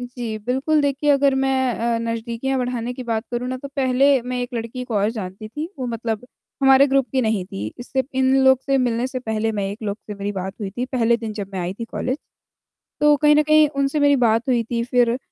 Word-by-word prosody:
जी, 245 -3 -5
बिल्कुल, 270 +5 +2
देखिए 285 +1 +1
अगर 280 -1 +4
मैं 265 -1 +1
अ, 235 0 0
नज़दीकियाँ 230 +3 -2
बढ़ाने 245 -1 -2
की 255 - -6
बात 225 -2 -2
करूँ 245 +1 -2
ना, 255 - -2
तो 280 +2 -8
पहले 270 0 +3
मैं 250 0 -3
एक 245 0 -6
लड़की 230 +2 -4
को 245 -3 -5
और 205 +1 +2
जानती 210 -1 -7
थी, 300 +8 -5
वो 255 - -3
मतलब 230 0 -3 0.4
हमारे 270 +1 +7
ग्रुप 270 -1 +2
की 265 - +2
नहीं 220 -4 0
थी 100 - -5
इससे 260 +2 -2
इन 265 0 +3
लोग 265 -1 +6
से 275 -1 +2
मिलने 245 -1 0
से 260 0 -4
पहले 220 -2 -2
मैं 205 -2 -2
एक 205 - -7
लोग 205 -1 -2
से 210 - -6
मेरी 200 0 -4
बात 190 -1 -4
हुई 200 -2 -3
थी, 240 +6 -3
पहले 235 -3 +2
दिन 225 -2 -5
जब 205 -2 -5
मैं 190 - -3
आई 175 +1 -2
थी 230 - -6
कॉलेज। 255 +4 -3 0.8
तो 295 0 +5
कहीं 300 0 +5
न 300 - +4
कहीं 305 0 +5
उनसे 275 +1 -1
मेरी 285 0 +5
बात 235 -1 +2
हुई 240 -2 +2
थी 235 +1 -2
फिर, 245 -1 +2
245 Hz, 235 wpm, -21 LUFS, 225-270 Hz, 0.8 s, हमारे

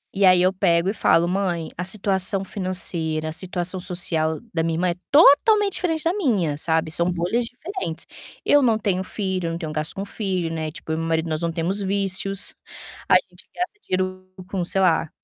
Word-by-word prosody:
E 200 - +3
aí 180 -1 +5
eu 185 +1 +3
pego 180 -1 +2
e - - -1
falo: 170 -5 +3
"Mãe, 180 -3 -1
a 180 - -4
situação 195 0 +1
financeira, 170 -5 -2
a - - -6
situação 180 +1 -1
social 165 -3 0
da 165 - 0
minha 165 0 -1
irmã 180 +1 +1
é 170 - -2 0.2
totalmente 395 +8 +5
diferente 325 -4 -1
da 335 - +1
minha, 215 - 0
sabe. 160 +1 0
São 170 +2 +2
bolhas 180 +8 -1
diferentes. 245 - -5 0.4
Eu 290 - +5
não 230 -4 +3
tenho 190 -3 -1
filho, 190 -3 -3
eu 165 - -2
não - - -3
tenho 160 -3 -5
gasto 155 0 -3
com 195 - -4
filho, 185 -6 -3
né, 155 -1 -3
tipo, 160 - -8
eu 160 - 0
e - - -3
meu 165 - -3
marido 160 0 0
nós 155 0 -2
não 170 -1 -1
temos 175 +5 -1
vícios, 195 0 +2 0.5
a - - +4 0.2
gente - - -9
gasta 360 +4 -4
dinheiro 185 0 -3 0.2
com, 190 -3 -2
sei 195 +2 -1
lá, 165 -3 +2
185 Hz, 205 wpm, -22 LUFS, 165-200 Hz, 0.5 s, aí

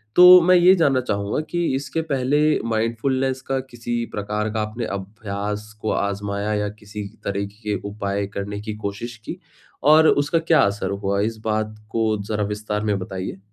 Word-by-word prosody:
तो 180 0 +10
मैं 180 +2 +5
ये 180 +1 +7
जानना 140 -7 +3
चाहूँगा 100 +6 -1
कि 175 -1 0
इसके 135 +3 -2
पहले 135 +2 +2 0.3
माइंडफुलनेस 130 +4 0
का 135 0 0
किसी 120 -1 -3
प्रकार 105 +1 -2
का 110 - 0
आपने 110 +2 -3
अभ्यास 105 +1 -5
को 110 - -1
आज़माया 100 +1 -1
या 105 0 -1
किसी 105 0 -7 0.2
तरह 100 0 -2 0.2
के 105 -1 -1
उपाय 100 -1 -2
करने 100 +1 -4
की 110 0 -5
कोशिश 115 +4 -5
की? - - -6 0.4
और 155 +2 +7
उसका 145 +3 +3
क्या 165 0 +4
असर 100 +1 0
हुआ? 100 0 -1
इस 110 +1 -1
बात 110 0 -1
को 110 -2 +1
ज़रा 105 +1 -2
विस्तार 105 0 -3
में 105 -2 +1
बताइए। 95 0 -5
110 Hz, 170 wpm, -22 LUFS, 100-130 Hz, 0.4 s, तो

